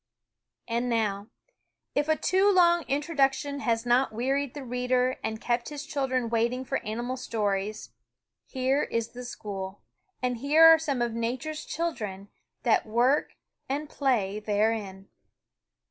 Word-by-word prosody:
And 235 Hz, +1 st, -1 dB
now, 210 Hz, -3 st, 0 dB, 0.7 s
if 290 Hz, +1 st, +1 dB
a 315 Hz, -, +4 dB
too 380 Hz, +5 st, +3 dB
long 345 Hz, -2 st, +5 dB
introduction 280 Hz, -1 st, 0 dB
has 230 Hz, -3 st, 0 dB
not 245 Hz, +2 st, +3 dB
wearied 265 Hz, +4 st, -1 dB
the 290 Hz, -, -6 dB
reader 250 Hz, +1 st, 0 dB
and 220 Hz, 0 st, -3 dB
kept 240 Hz, 0 st, -1 dB
his 295 Hz, -1 st, -6 dB
children 260 Hz, -5 st, -1 dB
waiting 235 Hz, +3 st, 0 dB
for 270 Hz, -, -1 dB
animal 240 Hz, +4 st, -3 dB
stories, 210 Hz, -4 st, -2 dB, 0.6 s
here 265 Hz, +2 st, +1 dB
is 230 Hz, 0 st, -2 dB
the 250 Hz, +1 st, -9 dB
school, 200 Hz, -5 st, -6 dB, 0.4 s
and 250 Hz, -1 st, -1 dB
here 295 Hz, +6 st, +5 dB
are 325 Hz, 0 st, +9 dB
some 280 Hz, -6 st, -1 dB
of 235 Hz, -1 st, -2 dB
Nature's 255 Hz, +7 st, -3 dB
children 210 Hz, -, -4 dB, 0.3 s
that 225 Hz, -1 st, +2 dB
work 245 Hz, +6 st, +2 dB, 0.4 s
and 290 Hz, +3 st, -2 dB
play 215 Hz, -8 st, 0 dB
therein. 205 Hz, -2 st, -1 dB
250 Hz, 135 wpm, -27 LUFS, 225-280 Hz, 0.7 s, are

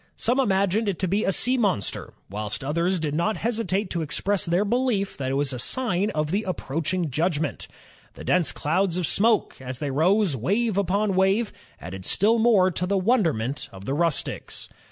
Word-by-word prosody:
Some 250 Hz, +3 st, +1 dB
imagined 200 Hz, -2 st, +1 dB
it 190 Hz, -, -2 dB
to 185 Hz, -, -1 dB
be 200 Hz, +5 st, +1 dB
a -, -, +2 dB
sea 250 Hz, +6 st, +2 dB
monster, 190 Hz, -, -1 dB
whilst 105 Hz, +4 st, -4 dB
others 170 Hz, +6 st, 0 dB
did 150 Hz, -2 st, -2 dB
not 170 Hz, +8 st, 0 dB
hesitate 215 Hz, -4 st, -1 dB
to 170 Hz, -, -1 dB
express 185 Hz, +6 st, 0 dB
their 175 Hz, +5 st, +2 dB
belief 230 Hz, -3 st, 0 dB
that 130 Hz, -2 st, -3 dB
it 135 Hz, -, -1 dB
was 140 Hz, -1 st, +1 dB
a 125 Hz, -, -5 dB
sign 205 Hz, -, 0 dB
of 150 Hz, 0 st, -1 dB
the 200 Hz, +3 st, +1 dB
approaching 170 Hz, -3 st, -2 dB
judgment.... 155 Hz, 0 st, -1 dB, 0.5 s
The -, -, -10 dB
dense 175 Hz, -5 st, +2 dB
clouds 175 Hz, +3 st, 0 dB
of 180 Hz, -, 0 dB
smoke, 220 Hz, +7 st, +2 dB
as 130 Hz, -1 st, -4 dB
they 145 Hz, 0 st, -3 dB
rose, 175 Hz, +4 st, +2 dB
wave 205 Hz, -, 0 dB
upon 200 Hz, +1 st, +1 dB
wave, 195 Hz, +4 st, +2 dB, 0.3 s
added 95 Hz, +2 st, -8 dB
still 220 Hz, -, +3 dB
more 210 Hz, -5 st, +4 dB
to 180 Hz, +1 st, -2 dB
the 200 Hz, +1 st, +1 dB
wonderment 165 Hz, -, 0 dB
of 95 Hz, 0 st, -11 dB
the 135 Hz, -, -2 dB
rustics. 165 Hz, 0 st, -2 dB
185 Hz, 185 wpm, -24 LUFS, 150-205 Hz, 0.5 s, more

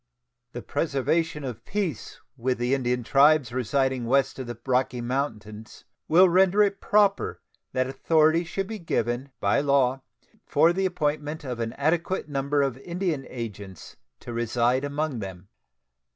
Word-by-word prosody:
The 120 Hz, -, -6 dB
preservation 150 Hz, +2 st, -1 dB
of 120 Hz, -4 st, -6 dB
peace 185 Hz, -, -4 dB, 0.2 s
with 130 Hz, 0 st, -1 dB
the 120 Hz, +2 st, 0 dB
Indian 125 Hz, -2 st, 0 dB
tribes 140 Hz, 0 st, +4 dB
residing 130 Hz, 0 st, 0 dB
west 135 Hz, +2 st, +1 dB
of 130 Hz, -, -5 dB
the 120 Hz, -1 st, -6 dB
Rocky 130 Hz, -1 st, +1 dB
Mountains 110 Hz, -4 st, -4 dB, 0.2 s
will 180 Hz, +4 st, +6 dB
render 190 Hz, +3 st, +4 dB
it 200 Hz, -1 st, -1 dB
proper 205 Hz, -1 st, +2 dB, 0.3 s
that 130 Hz, 0 st, +1 dB
authority 155 Hz, +5 st, +2 dB
should 195 Hz, +3 st, -3 dB
be 220 Hz, +2 st, -6 dB
given 125 Hz, -, -2 dB
by 100 Hz, -, +2 dB
law 135 Hz, -2 st, +2 dB, 0.4 s
for 160 Hz, +4 st, +3 dB
the 190 Hz, +1 st, +1 dB
appointment 150 Hz, -3 st, -2 dB
of 125 Hz, -3 st, -5 dB
an 115 Hz, -1 st, -3 dB
adequate 170 Hz, +4 st, -1 dB
number 140 Hz, 0 st, 0 dB
of 135 Hz, -2 st, -2 dB
Indian 170 Hz, -3 st, -3 dB
agents 100 Hz, -6 st, -8 dB, 0.3 s
to 120 Hz, -, -7 dB
reside 120 Hz, +2 st, +1 dB
among 145 Hz, -2 st, -2 dB
them. 95 Hz, -2 st, -8 dB
135 Hz, 145 wpm, -26 LUFS, 120-160 Hz, 0.4 s, will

